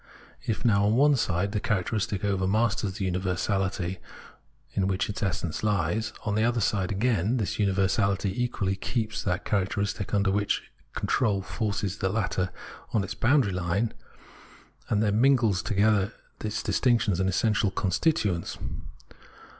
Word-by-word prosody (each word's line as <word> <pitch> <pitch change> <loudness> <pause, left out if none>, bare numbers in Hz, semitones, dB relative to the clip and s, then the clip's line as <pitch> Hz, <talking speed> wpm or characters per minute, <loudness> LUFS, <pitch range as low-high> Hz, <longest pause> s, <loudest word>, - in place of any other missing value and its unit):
If, 115 +3 -2
now, 100 -3 +4
on 105 +2 +3
one 145 +3 +5
side, 100 -4 0
the 105 - 0
characteristic 105 +1 -1
overmasters 100 +1 +1
the 95 -3 -1
universahty 95 0 -1 0.7
in 95 -1 +1
which 95 -1 0
its 105 - -5
essence 85 -5 -2
lies, 105 +1 0
on 105 - 0
the 110 +1 +2
other 120 0 +2
side, 95 -2 0
again, 110 +2 +1
this 105 -2 -2
universality 100 +1 +1
equally 100 -6 -1
keeps 110 +1 -2
that 90 -1 -2
characteristic 100 0 -1
under 100 -2 +2 0.6
control, 105 -7 +1
forces 100 -3 -2
the 95 - +1
latter 95 -3 0 0.4
on 110 - +2
to - - -2
its 100 - -5
boundary 115 -2 +2
Une, 90 +5 -1 1.0
and 105 -1 +2
there 105 - +2
mingles 115 -4 +3
together 105 +1 +2 0.3
its 110 0 -2
distinctions 115 -7 +2
and 95 0 +2
its 95 - 0
essential 105 -2 +2
constituents. 95 - 0
100 Hz, 140 wpm, -27 LUFS, 95-110 Hz, 1.0 s, one